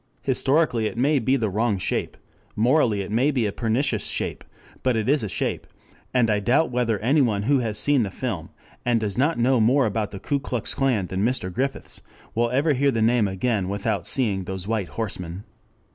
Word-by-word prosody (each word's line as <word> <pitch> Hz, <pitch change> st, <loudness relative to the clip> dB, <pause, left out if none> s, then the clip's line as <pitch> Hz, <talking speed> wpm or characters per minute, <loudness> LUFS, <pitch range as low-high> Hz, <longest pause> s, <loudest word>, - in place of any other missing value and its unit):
Historically 130 Hz, -3 st, +1 dB
it 115 Hz, -, -6 dB
may 140 Hz, +4 st, +3 dB
be 130 Hz, +3 st, +2 dB
the 115 Hz, -5 st, 0 dB
wrong 105 Hz, +1 st, 0 dB
shape, 90 Hz, -, -2 dB, 0.4 s
morally 115 Hz, -3 st, +3 dB
it 95 Hz, -, -6 dB
may 125 Hz, +6 st, +2 dB
be 130 Hz, -6 st, +1 dB
a 105 Hz, -, 0 dB
pernicious 115 Hz, +1 st, 0 dB
shape, -, -, -3 dB, 0.4 s
but 125 Hz, -3 st, +1 dB
it 110 Hz, -, -1 dB
is 145 Hz, +2 st, +3 dB
a 105 Hz, -, -3 dB
shape, -, -, -2 dB, 0.4 s
and 125 Hz, -3 st, +3 dB
I 105 Hz, -1 st, +2 dB
doubt 125 Hz, +10 st, +2 dB
whether 120 Hz, -3 st, +1 dB
anyone 120 Hz, -5 st, +2 dB
who 135 Hz, +4 st, +3 dB
has 110 Hz, -4 st, -2 dB
seen 145 Hz, +1 st, +4 dB
the 105 Hz, -, -1 dB
film 95 Hz, -6 st, -4 dB, 0.3 s
and 120 Hz, -1 st, +2 dB
does 105 Hz, -3 st, -2 dB
not 145 Hz, +7 st, +1 dB
know 120 Hz, 0 st, +3 dB
more 130 Hz, +5 st, +4 dB
about 110 Hz, -1 st, -1 dB
the 100 Hz, -, -8 dB
Ku 140 Hz, +7 st, -1 dB
Klux 125 Hz, -5 st, -3 dB
Klan 125 Hz, -8 st, +1 dB
than 95 Hz, +2 st, -2 dB
Mr. 110 Hz, -6 st, -1 dB
Griffiths, 135 Hz, +5 st, -3 dB, 0.3 s
will 120 Hz, +1 st, +1 dB
ever 140 Hz, +5 st, +2 dB
hear 140 Hz, +1 st, +2 dB
the 115 Hz, -4 st, 0 dB
name 115 Hz, -2 st, +3 dB
again 95 Hz, 0 st, -1 dB
without 100 Hz, -2 st, -2 dB
seeing 100 Hz, -8 st, 0 dB
those 95 Hz, 0 st, -5 dB
white 110 Hz, -4 st, -1 dB
horsemen. 90 Hz, -1 st, -5 dB
115 Hz, 200 wpm, -24 LUFS, 105-130 Hz, 0.4 s, seen